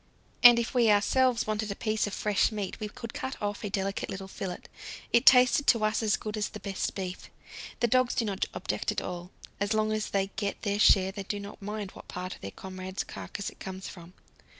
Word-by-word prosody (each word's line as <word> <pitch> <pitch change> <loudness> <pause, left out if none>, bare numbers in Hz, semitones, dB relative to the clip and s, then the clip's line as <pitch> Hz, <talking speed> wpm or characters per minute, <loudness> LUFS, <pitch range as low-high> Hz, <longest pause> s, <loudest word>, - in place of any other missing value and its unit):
And 240 -1 +10
if 235 +2 -1
we 240 -3 +4
ourselves 235 +4 +3
wanted 215 0 -2
a 200 - -3
piece 215 -1 0
of 205 - -5
fresh 210 +1 +2
meat 205 -3 -4
we 210 - -4
could 230 +2 -8
cut 265 0 -5
off 205 +2 -3
a 210 - -2
delicate 195 0 -2
little 195 0 -5
fillet; 190 -2 -5 0.5
it 235 - +4
tasted 250 +2 +7
to 230 -2 +5
us 215 +1 +1
as 215 -1 +2
good 215 0 -5
as 210 - -1
the 210 - -8
best 195 -1 -3
beef. 185 -2 -5 0.5
The 240 - +4
dogs 255 +1 +2
do 230 - +1
not 195 -2 -1
object - - -2
at - - -2
all; 175 0 -6 0.3
as 205 +2 0
long 215 0 +1
as 215 0 -1
they 195 0 0
get 200 -2 -3
their 205 0 0
share 190 -2 +5
they 200 +1 -6
do 205 +1 -4
not 200 +1 -9
mind 205 -1 -5
what - - -13
part 180 0 -5
of - - -14
their 100 - -5
comrade's 185 - -6
carcass 200 - -6
it - - -21
comes 190 0 -6
from. 175 0 -11
205 Hz, 225 wpm, -29 LUFS, 195-220 Hz, 0.5 s, And